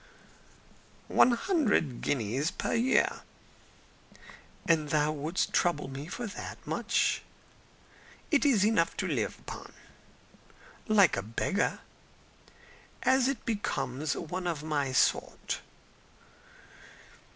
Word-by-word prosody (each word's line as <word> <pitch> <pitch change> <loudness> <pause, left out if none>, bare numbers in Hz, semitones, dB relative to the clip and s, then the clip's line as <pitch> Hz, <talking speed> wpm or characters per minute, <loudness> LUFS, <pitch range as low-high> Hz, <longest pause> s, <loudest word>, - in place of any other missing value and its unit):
"One 245 - +6
hundred 235 - +1
guineas 135 - 0
a - - -1
year." 245 +3 +2 1.5
"And 155 -3 +2
thou 150 0 +2
wouldst 155 +4 -2
trouble 170 -5 +1
me 135 +3 -7
for 240 +7 -5
that 210 - -7
much?" - - +1 1.1
"It 290 - +4
is 240 -9 +4
enough 215 -6 +2
to - - -1
live - - -1
upon." - - -9 1.1
"Like 205 -5 +5
a - - 0
beggar." 115 - -1 1.2
"As 260 -1 +4
it 275 -4 -2
becomes 145 - -2
one 180 +3 -4
of 160 -4 -2
my 145 -4 -1
sort." 130 - +1
165 Hz, 100 wpm, -30 LUFS, 145-225 Hz, 1.5 s, One